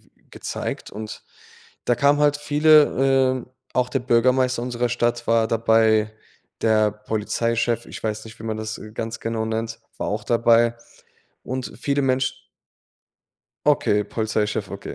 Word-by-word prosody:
w -, -, -34 dB
gezeigt -, -, -5 dB
und 110 Hz, +1 st, -8 dB, 0.6 s
da 120 Hz, -, +2 dB
kamen 140 Hz, +4 st, +3 dB
halt 145 Hz, 0 st, +3 dB
viele. 145 Hz, -3 st, +4 dB
Äh, -, -, -18 dB, 0.2 s
auch 125 Hz, 0 st, +1 dB
der 135 Hz, -, 0 dB
Bürgermeister 125 Hz, +1 st, +2 dB
unserer 120 Hz, -1 st, -1 dB
Stadt 120 Hz, 0 st, -1 dB
war 115 Hz, -1 st, +3 dB
dabei, 110 Hz, -1 st, +3 dB, 0.5 s
der 110 Hz, -1 st, +3 dB
Polizeichef 115 Hz, +2 st, -1 dB
ich -, -, -9 dB
weiß 110 Hz, 0 st, -3 dB
nicht, 110 Hz, 0 st, -12 dB
wie -, -, -10 dB
man 110 Hz, -1 st, -3 dB
das, 110 Hz, 0 st, -5 dB
äh, 110 Hz, -, -10 dB
ganz 115 Hz, +1 st, -5 dB
genau 115 Hz, -1 st, -2 dB
nennt, 115 Hz, 0 st, -3 dB, 0.2 s
war -, -, -3 dB
auch 105 Hz, +1 st, -2 dB
dabei 115 Hz, 0 st, +3 dB, 0.7 s
und 130 Hz, 0 st, -5 dB
viele 140 Hz, 0 st, 0 dB
Mensch 130 Hz, 0 st, -1 dB, 1.2 s
Okay, 105 Hz, 0 st, +3 dB
Polizeichef, 110 Hz, 0 st, -2 dB
okay. -, -, -7 dB
115 Hz, 145 wpm, -23 LUFS, 110-130 Hz, 1.2 s, viele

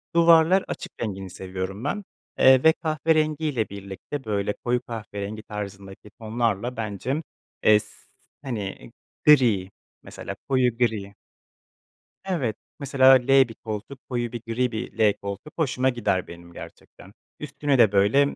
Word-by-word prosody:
Duvarlar 170 Hz, +2 st, +6 dB
açık -, -, -6 dB
rengini 95 Hz, -4 st, -4 dB
seviyorum 95 Hz, +2 st, -6 dB
ben, 200 Hz, +9 st, -2 dB, 0.4 s
eee, 130 Hz, -1 st, +6 dB
ve 160 Hz, 0 st, +7 dB
kahverengiyle 155 Hz, -, 0 dB
birlikte, 100 Hz, +8 st, -7 dB
böyle, 105 Hz, -1 st, -1 dB
koyu 120 Hz, +2 st, -1 dB
kahverengi 110 Hz, -3 st, -6 dB
tarzındaki 100 Hz, -1 st, -8 dB
tonlarla 115 Hz, +1 st, -1 dB
bence, 115 Hz, -, -3 dB, 0.4 s
eee, 105 Hz, -1 st, +6 dB
s -, -, -9 dB, 0.5 s
hani, 115 Hz, -6 st, -5 dB, 0.3 s
gri, 120 Hz, -11 st, +5 dB, 0.3 s
mesela -, -, -8 dB
koyu 125 Hz, -3 st, +2 dB
gri. 110 Hz, -5 st, -1 dB, 1.1 s
Evet, 145 Hz, -, -1 dB, 0.2 s
mesela 135 Hz, -2 st, +5 dB
L 125 Hz, -1 st, 0 dB, 0.2 s
bir 115 Hz, -, -10 dB
koltuk, 110 Hz, +5 st, -7 dB
koyu 120 Hz, -2 st, -2 dB
bir 120 Hz, -, -6 dB
gri 125 Hz, +2 st, 0 dB
bir 110 Hz, -, -6 dB
L 105 Hz, -2 st, +5 dB
koltuk 100 Hz, +10 st, -8 dB
hoşuma 130 Hz, -4 st, +1 dB
gider 115 Hz, -7 st, -1 dB
benim 85 Hz, 0 st, -12 dB
gerçekten. 95 Hz, +3 st, -13 dB, 0.3 s
Üstüne 145 Hz, -2 st, -1 dB
de, 115 Hz, -5 st, +6 dB
böyle, 105 Hz, +9 st, +3 dB
115 Hz, 130 wpm, -24 LUFS, 100-135 Hz, 1.1 s, ve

